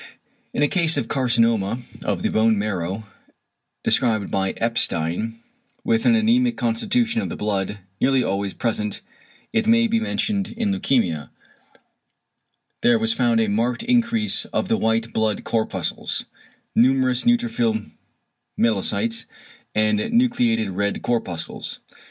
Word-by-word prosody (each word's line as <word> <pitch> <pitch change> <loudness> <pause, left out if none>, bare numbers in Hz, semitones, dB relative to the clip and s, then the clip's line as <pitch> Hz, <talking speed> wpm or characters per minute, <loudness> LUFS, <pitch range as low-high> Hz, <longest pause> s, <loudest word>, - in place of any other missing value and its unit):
In 145 - 0
a - - +5
case 165 -1 +2
of - - -1
carcinoma 115 -5 +1 0.3
of - - -2
the - - +1
bone 110 0 +3
marrow, 100 0 -2 0.8
described 110 -3 +1
by 95 -1 0
Epstein, 115 -1 -1 0.5
with 225 -1 +1
an 240 - +6
anæmic 235 +2 +2
constitution 225 - +1
of - - -3
the - - -5
blood 105 -1 -2 0.2
(nearly 135 -1 +3
always 100 0 -2
present 105 -3 -2 0.5
it 225 -1 +1
may 230 0 +5
be 230 0 +1
mentioned 210 -2 -1
in 220 -3 0
leukæmia), 115 - 0 1.5
there 120 -1 +4
was 110 0 +1
found 120 -1 +2
a 110 - +2
marked 115 +4 0
increase 235 -2 +1
of - - -2
the 225 - +3
white 115 - 0
blood 110 -2 0
corpuscles, 110 -1 -2 0.5
numerous 130 0 +3
neutrophil 220 - +1 0.7
myelocytes 115 - 0 0.5
and 105 -1 +2
nucleated 240 - +2
red 100 +2 -2
corpuscles. 90 -9 -3
115 Hz, 125 wpm, -22 LUFS, -, 1.5 s, an